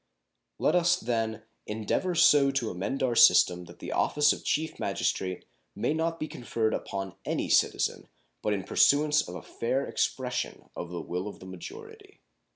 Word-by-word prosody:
Let -, -, +2 dB
us, 175 Hz, 0 st, +4 dB
then, 110 Hz, -2 st, -2 dB, 0.2 s
endeavor 110 Hz, -, -1 dB
so 145 Hz, -3 st, +6 dB
to 135 Hz, -5 st, -1 dB
amend 100 Hz, +10 st, -3 dB
our 125 Hz, -2 st, +1 dB
system 90 Hz, -2 st, +6 dB
that 85 Hz, -, -14 dB
the -, -, -7 dB
office 150 Hz, 0 st, +3 dB
of -, -, -9 dB
Chief 160 Hz, +1 st, -1 dB
Magistrate 95 Hz, -1 st, -2 dB, 0.3 s
may -, -, 0 dB
not 165 Hz, +1 st, -1 dB
be 155 Hz, -, -3 dB
conferred 115 Hz, -5 st, -2 dB
upon 95 Hz, -1 st, -4 dB
any -, -, -2 dB
citizen -, -, +1 dB, 0.3 s
but 105 Hz, -, -1 dB
in 100 Hz, -2 st, -1 dB
pursuance 150 Hz, +6 st, +4 dB
of 90 Hz, -, -8 dB
a -, -, -8 dB
fair 130 Hz, +4 st, -2 dB
expression 125 Hz, -1 st, -3 dB
of 85 Hz, -, -6 dB
the 85 Hz, -1 st, -5 dB
will 90 Hz, +4 st, -4 dB
of 105 Hz, -, -8 dB
the -, -, -12 dB
majority. 95 Hz, -2 st, -11 dB
115 Hz, 165 wpm, -28 LUFS, 95-150 Hz, 0.3 s, so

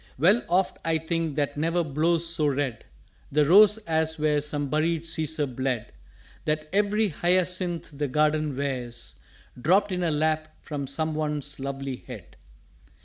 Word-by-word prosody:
'" -, -, -25 dB
"_Well 195 Hz, -, +4 dB
oft 185 Hz, +2 st, +1 dB
I 165 Hz, -1 st, +1 dB
think 160 Hz, -1 st, -2 dB
that 145 Hz, -1 st, -1 dB
never 165 Hz, +3 st, +1 dB
blows 160 Hz, +3 st, +1 dB
so 165 Hz, -3 st, +2 dB
red 135 Hz, -4 st, -2 dB, 0.5 s
The 150 Hz, +1 st, +3 dB
Rose 205 Hz, +6 st, +7 dB
as 160 Hz, 0 st, +1 dB
where 150 Hz, -1 st, +1 dB
some 145 Hz, -1 st, -2 dB
buried 155 Hz, +3 st, 0 dB
Cæsar 160 Hz, -5 st, -1 dB
bled: 130 Hz, -3 st, -2 dB, 0.5 s
That 155 Hz, 0 st, -1 dB
every 210 Hz, +1 st, +2 dB
Hyacinth 180 Hz, 0 st, 0 dB
the 145 Hz, +1 st, -2 dB
Garden 150 Hz, 0 st, +1 dB
wears 125 Hz, -4 st, -4 dB, 0.4 s
Dropt 195 Hz, +7 st, +3 dB
in 180 Hz, -1 st, -1 dB
her 170 Hz, -, +1 dB
lap 155 Hz, +1 st, 0 dB
from 145 Hz, -3 st, -4 dB
some 155 Hz, +3 st, -1 dB
once 150 Hz, -2 st, -2 dB
lovely 135 Hz, -1 st, -4 dB
Head. -, -, -11 dB
155 Hz, 150 wpm, -26 LUFS, 145-170 Hz, 0.5 s, Rose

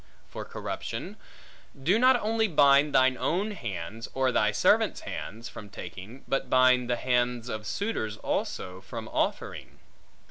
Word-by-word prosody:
For -, -, -7 dB
corruption: -, -, -5 dB, 0.7 s
do 185 Hz, +10 st, +3 dB
not 255 Hz, 0 st, +5 dB
only 220 Hz, +1 st, +1 dB
bind 145 Hz, -3 st, +5 dB
thine 130 Hz, 0 st, +5 dB
own 195 Hz, +6 st, 0 dB
hands, 110 Hz, -, -6 dB
or 130 Hz, -1 st, +2 dB
thy 105 Hz, -3 st, +3 dB
servants' -, -, +3 dB
hands, 115 Hz, +4 st, -6 dB
from 105 Hz, -4 st, -10 dB
taking, 100 Hz, +5 st, -9 dB
but 135 Hz, -, -1 dB
bind 130 Hz, -1 st, +4 dB
the 120 Hz, -, +2 dB
hands 125 Hz, -1 st, 0 dB
of 110 Hz, -2 st, -5 dB
suitors 110 Hz, -, -2 dB
also, 95 Hz, -2 st, -3 dB
from -, -, -7 dB
offering. -, -, -2 dB
125 Hz, 140 wpm, -28 LUFS, 110-150 Hz, 0.7 s, not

